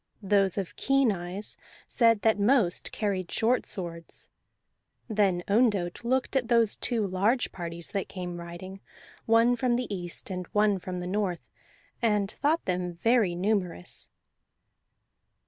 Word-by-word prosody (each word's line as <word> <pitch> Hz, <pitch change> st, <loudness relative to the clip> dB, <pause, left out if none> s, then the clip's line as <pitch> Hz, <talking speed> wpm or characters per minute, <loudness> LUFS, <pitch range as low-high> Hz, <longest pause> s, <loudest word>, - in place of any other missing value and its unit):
Those 195 Hz, -1 st, +2 dB
of 195 Hz, -3 st, -3 dB
keen 275 Hz, -3 st, +3 dB
eyes 185 Hz, +2 st, -5 dB, 0.3 s
said 230 Hz, -3 st, +3 dB
that 220 Hz, -2 st, +3 dB
most 205 Hz, -4 st, +3 dB
carried 195 Hz, -4 st, -2 dB
short 235 Hz, +2 st, +1 dB
swords. 170 Hz, -4 st, -4 dB, 0.8 s
Then 200 Hz, -5 st, +1 dB
Ondott 205 Hz, -4 st, +2 dB
looked 260 Hz, +3 st, 0 dB
at 255 Hz, -3 st, +1 dB
those 230 Hz, -3 st, +3 dB
two 230 Hz, -4 st, 0 dB
large 200 Hz, +7 st, +1 dB
parties 170 Hz, -1 st, -6 dB
that 195 Hz, -2 st, -2 dB
came 180 Hz, -2 st, -5 dB
riding, 175 Hz, +3 st, -8 dB, 0.5 s
one 230 Hz, +2 st, +5 dB
from 245 Hz, 0 st, +1 dB
the 250 Hz, +1 st, -1 dB
east 175 Hz, +1 st, -4 dB
and 180 Hz, -2 st, -4 dB
one 210 Hz, -2 st, +3 dB
from 180 Hz, 0 st, -5 dB
the -, -, -5 dB
north, 185 Hz, -2 st, -2 dB, 0.5 s
and 210 Hz, -3 st, +1 dB
thought 310 Hz, +4 st, 0 dB
them 180 Hz, -1 st, -1 dB
very 200 Hz, +1 st, +2 dB
numerous. 180 Hz, -, -2 dB
200 Hz, 135 wpm, -28 LUFS, 180-230 Hz, 0.8 s, one